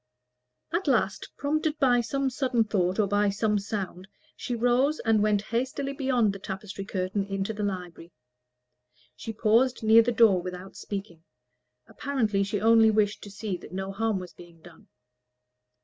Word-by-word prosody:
At 345 0 -1
last, 220 -7 +1
prompted 310 +1 -1
by 245 -4 +3
some 270 +3 -1
sudden 250 -3 +1
thought 190 -4 0
or 215 - +3
by 205 +1 +2
some 210 +1 0
sound, 195 -2 -5 0.3
she 245 - -4
rose 245 +6 +2
and 225 -2 +2
went 210 -1 +2
hastily 260 +5 -2
beyond 255 -6 +1
the 195 - -8
tapestry 195 0 -6
curtain 190 0 -2
into 195 +2 -3
the 210 - -6
library. 180 -4 -5 1.0
She 175 - -6
paused 230 +3 +2
near 220 +1 +7
the 235 +2 0
door 220 -6 +4
without 180 +1 -8
speaking: 195 -5 -7 0.6
apparently 225 -8 -1
she 200 +1 -1
only 225 +1 +5
wished 210 -1 +1
to - - -9
see 200 -2 -4
that - - -13
no 190 +1 -4
harm 220 +1 -1
was 180 -1 -8
being 170 -1 -15
done. 175 -2 -16
210 Hz, 160 wpm, -27 LUFS, 195-240 Hz, 1.0 s, near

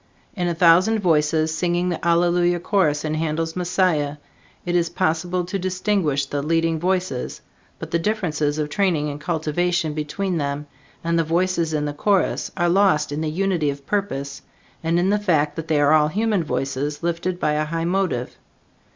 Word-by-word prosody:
In 180 -3 -1
a 170 - -1
thousand 180 +6 +5
voices 160 -4 +2
singing 175 +2 0
the 175 - -2
Hallelujah 175 +1 +2
Chorus 160 -6 +1
in 155 - -1
Handel's 160 +1 -2
"Messiah," 175 -5 0 0.5
it 175 0 -1
is 170 -1 +2
possible 175 +3 -1
to 195 +2 -3
distinguish 185 -6 0
the 140 +1 -3
leading 165 +1 +1
voices, 180 -6 -2 0.4
but - - -8
the 170 - +1
differences 160 -7 -1
of 150 -1 -2
training 160 -4 +1
and 145 +1 -8
cultivation 165 0 -1
between 165 +4 -2
them 140 0 -3 0.4
and 170 0 +1
the - - +3
voices 170 0 0
in 150 -1 -1
the 145 - -3
chorus, 195 +5 0
are 175 -1 +2
lost 175 -5 +3
in 150 +2 -3
the 160 - -1
unity 175 -2 0
of 140 0 -6
purpose 140 -9 -3 0.4
and 165 +1 +1
in 180 +3 +2
the 210 - +2
fact 155 -7 +1
that 160 0 -5
they 155 -2 +2
are 145 +1 +4
all 150 -1 +5
human 205 +2 0
voices 145 0 -3
lifted 170 +1 -2
by 150 - +1
a 150 0 0
high 165 +2 -2
motive. 175 -9 -1
165 Hz, 175 wpm, -22 LUFS, 150-180 Hz, 0.5 s, thousand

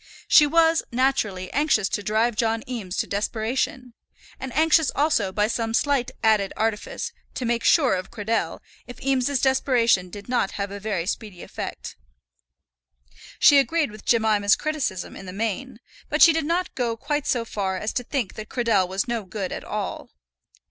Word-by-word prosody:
She 295 - +7
was, 325 +1 +4
naturally, 235 -8 0
anxious 285 -9 +2
to - - -2
drive 220 +3 +1
John 225 0 0
Eames 215 -7 -5
to - - +1
desperation; 230 +4 -2 0.5
and 265 -1 -5
anxious 320 -1 +4
also, 280 -10 +1
by 210 +2 +1
some 225 0 -1
slight 280 -3 +1
added 215 -3 +3
artifice, 220 -1 -2 0.2
to 255 - -3
make 235 0 0
sure 275 - +4
of 185 0 -3
Cradell 225 0 -2 0.3
if 245 - -10
Eames's 270 0 +1
desperation 240 -8 +2
did 200 +2 -10
not 245 -5 0
have 200 -1 -4
a 200 - -6
very 200 -5 -2
speedy 200 -2 -5
effect. - - -7 1.4
She 285 - +7
agreed 310 -1 +1
with 215 0 -12
Jemima's 215 -3 +3
criticism 285 -12 -3
in 190 - -10
the 180 - -7
main, 225 +4 -3 0.3
but 300 - +4
she 335 - +8
did 320 -1 -1
not 345 +3 -1
go 235 -3 -2
quite 290 +4 -2
so 235 -2 0
far 195 -4 -2
as 215 +3 -3
to 245 - -2
think 245 -5 -3
that 215 0 -8
Cradell 230 -7 +1
was 190 +4 -2
no 235 -2 -2
good 190 0 -5
at - - -5
all. - - -5
230 Hz, 170 wpm, -24 LUFS, 205-270 Hz, 1.4 s, she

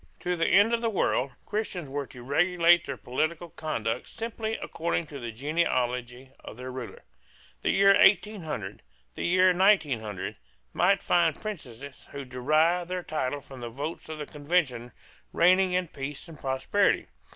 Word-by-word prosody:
To 180 0 -1
the 165 - +1
end 205 +5 +5
of 230 - +1
the 230 - +1
world, 140 - 0
Christians 205 -6 -3
were 140 0 -4
to 125 - -12
regulate 175 +4 +4
their 135 -2 -4
political 160 +6 -2
conduct 115 -8 -3
simply 225 -1 -4
according 165 0 -2
to 145 -2 -9
the 120 -2 -5
genealogy 125 -2 -1
of - - -11
their 130 +1 -6
ruler. 125 -2 -8 0.6
The - - 0
year 195 0 +6
1800, 175 - +2 0.3
the - - -3
year 185 +1 +4
1900, 140 - +1 0.4
might 195 +2 +3
find 170 -3 +2
princes 140 - -8
who 140 -1 -6
derived 155 +8 +1
their 180 -1 -3
title 145 -3 -2
from 135 -2 -12
the 120 - -5
votes 145 +7 -6
of 155 - -5
the 150 - -5
Convention 145 -6 -1 0.4
reigning 185 +1 +4
in 180 -1 +1
peace 140 +2 -7
and 165 - -11
prosperity. 135 +10 +1
155 Hz, 155 wpm, -27 LUFS, 130-180 Hz, 0.6 s, year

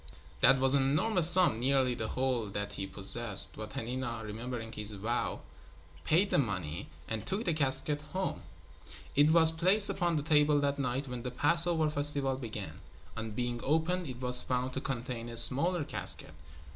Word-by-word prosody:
That 135 - +5
was 135 0 +2
an 140 - +3
enormous 160 +6 +3
sum, 175 -10 +3
nearly 130 0 +1
the 110 -2 -4
whole 130 -3 -2
that 100 0 -5
he 95 - -5
possessed, 100 +1 +2
but 110 0 -9
Hanina, 120 -1 -5
remembering 115 +1 -7
his 105 -1 -4
vow, 110 +5 -3 0.6
paid 185 +6 +1
the - - +2
money 90 - -4 0.2
and 110 -2 -5
took 200 +4 -4
the 170 - 0
casket 145 0 -1
home. 190 0 -4 0.7
It 145 +2 +4
was 160 0 +6
placed 185 +5 +2
upon 175 -2 -1
the 150 - -2
table 150 -1 +2
that 140 0 -2
night 130 +1 -3
when 125 -1 -7
the 125 - -5
Passover 165 +5 +2
festival 145 -2 -1
began. 110 - -8 0.3
On 110 0 -6
being 120 +2 -4
opened 160 +4 -1
it 125 -2 -8
was 125 -1 +8
found 125 0 -3
to 135 - -4
contain 120 -3 -6
a 115 - -6
smaller 150 +9 +5
casket. 80 - -3
130 Hz, 170 wpm, -30 LUFS, 115-155 Hz, 0.7 s, was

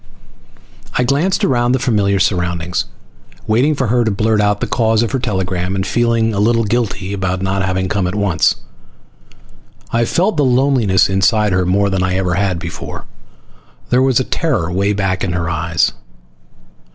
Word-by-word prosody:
I 125 - +2
glanced 155 +9 0
around 120 -1 +1
the - - +3
familiar 105 -6 +1
surroundings, 90 -2 -1 0.6
waiting 125 +8 +2
for 135 - -1
her 120 +1 +2
to 110 - 0
blurt 110 +1 +1
out 105 0 +1
the - - -1
cause 115 -1 +1
of 115 - -2
her 135 - -1
telegram, 95 -5 -2
and 95 0 -2
feeling 115 +1 +1
a 100 - -2
little 115 +2 +2
guilty 105 -3 -2
about 95 -1 -2
not 95 +1 -1
having 95 0 -1
come 95 -1 -1
at 90 - -3
once. 100 -6 +1 1.4
I 115 0 +2
felt 185 - 0
the 145 - +3
loneliness 125 -7 +3
inside 100 +2 +2
her 95 -1 +1
more 100 +2 +1
than 95 -1 0
I 95 0 0
ever 95 -2 0
had 95 -1 0
before. 85 -1 -7 0.9
There 125 +1 +4
was 130 -2 +3
a - - +1
terror 120 - -1
way 100 +3 0
back 95 -2 -1
in 90 - -2
her 85 -2 -2
eyes. 80 0 0
100 Hz, 175 wpm, -16 LUFS, 95-120 Hz, 1.4 s, There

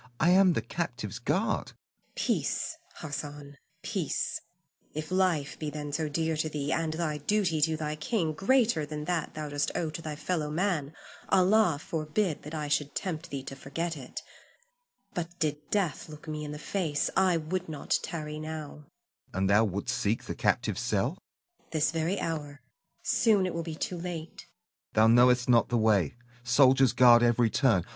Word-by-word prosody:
I 170 - +4
am 185 -1 +6
the 115 - -1
captive's 120 - -4
guard. 185 - 0
Zuleika. - - -22
Peace, 320 - -1 0.2
Hassan, 145 -2 -6 0.3
peace; - - -2 0.5
if 155 +2 -4
life 180 -6 +1
be 155 - -2
then 150 -1 -5
so 155 0 -1
dear 160 +2 0
to 155 +1 0
thee, 145 -1 -3
and 160 -1 0
thy 155 -2 -2
duty 175 -1 +1
to 160 +1 +2
thy 155 -1 -3
king 165 -1 0
greater 220 - +3
than 150 0 -5
that 175 -2 -2
thou 155 -1 -4
dost 145 0 0
owe 160 -2 -1
to 160 - -6
thy 155 -2 -5
fellow 155 0 -2
man, 160 -3 -1 0.3
Allah 190 -3 +4
forbid 160 +3 -1
that 150 +2 -7
I 150 -1 -3
should 145 0 0
tempt 180 -3 -3
thee 140 -2 -4
to 135 - -7
forget 165 +5 -3
it. 130 -4 -8 0.9
But 175 0 -4
did 150 -3 0
death 180 -8 -1
look 155 +1 -11
me 155 0 -4
in 150 - -5
the 150 - -5
face, 160 -3 -1
I 185 -2 +4
would 170 +3 -3
not 150 -3 -1
tarry 150 -2 -5
now. 155 -1 -7 0.4
Hassan. - - -9
And 95 0 +2
thou 110 +3 +5
wouldst 100 -1 -2
seek 105 +3 0
the - - -4
captive's - - 0
cell? 105 +3 +1
Zuleika. 350 - -22
This 155 -1 +2
very 165 +4 -1
hour. 145 -3 -4 0.4
Soon 210 -5 +3
it 185 - -2
will 170 - -2
be 165 -1 -5
too 175 +2 -3
late. 170 -2 -6
Hassan. 175 +1 -46
Thou 110 +1 +5
knowest 125 +1 +5
not 120 -2 +4
the 120 - +2
way, 105 -8 +3 0.3
soldiers 130 +1 +5
guard 120 -1 +7
every 120 -1 +3
turn. 110 - +3
155 Hz, 180 wpm, -29 LUFS, 140-170 Hz, 0.9 s, guard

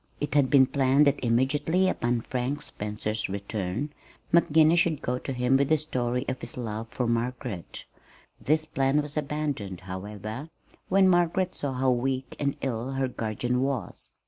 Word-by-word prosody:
It 145 - -2
had 140 -3 +4
been 135 -2 +7
planned 135 +2 +3
that 140 -1 +2
immediately 145 +10 +2
upon 120 -9 0
Frank 130 +5 -3
Spencer's 105 +1 -3
return, 100 +6 -3 0.4
McGinnis 160 0 +5
should 165 -4 +2
go 125 +1 -1
to - - -5
him 125 +1 +2
with 140 0 +1
the 155 - +5
story 125 -4 -2
of 130 - -3
his 120 - -5
love 110 -2 -4
for 125 +2 -2
Margaret. 120 -4 -3 0.6
This 155 +2 +2
plan 135 0 +1
was 145 0 -7
abandoned, 140 - -3
however, 105 - -6 0.4
when 190 0 +5
Margaret 175 +1 +2
saw 140 -2 -3
how 130 0 +2
weak 130 +1 -1
and 140 -1 0
ill 125 0 -2
her 135 0 0
guardian 125 +1 -2
was. 135 -2 -3
130 Hz, 160 wpm, -27 LUFS, 115-145 Hz, 0.6 s, been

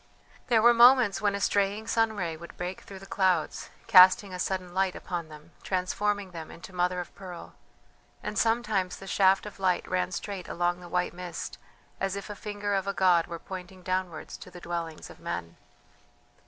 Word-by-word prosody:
There 225 -3 +4
were 240 0 +8
moments 240 -3 +6
when 205 -1 +2
a - - -2
straying 200 +2 +1
sun 225 -1 +1
ray 170 -5 -2
would 170 +2 -12
break 180 +1 -4
through 195 - -10
the 195 - -11
clouds, 185 -5 0 0.2
casting 185 +1 +7
a 180 - -5
sudden 185 -1 -2
light 190 0 +1
upon 175 -3 -4
them, 155 +2 -13
transforming 195 +1 -1
them 165 -2 -8
into 180 +2 -11
mother 180 0 0
of 175 - -7
pearl; 180 -3 -9 0.7
and 210 - -4
sometimes 220 -5 +1
the 195 - -10
shaft 195 0 +3
of 210 -1 -9
light 185 -2 +1
ran 180 0 0
straight 190 +1 -5
along 175 +1 0
the 175 -1 -11
white 180 0 0
mist 180 0 -6 0.4
as 195 0 -1
if 200 +1 -6
a - - -6
finger 205 0 -3
of 195 0 0
a 200 - 0
god 180 -3 +4
were 170 - -5
pointing 185 +1 -9
downwards 185 -3 -3
to - - -11
the 180 - -11
dwellings 170 -2 -5
of - - -15
men. 85 -1 -5
185 Hz, 190 wpm, -28 LUFS, 175-200 Hz, 0.7 s, were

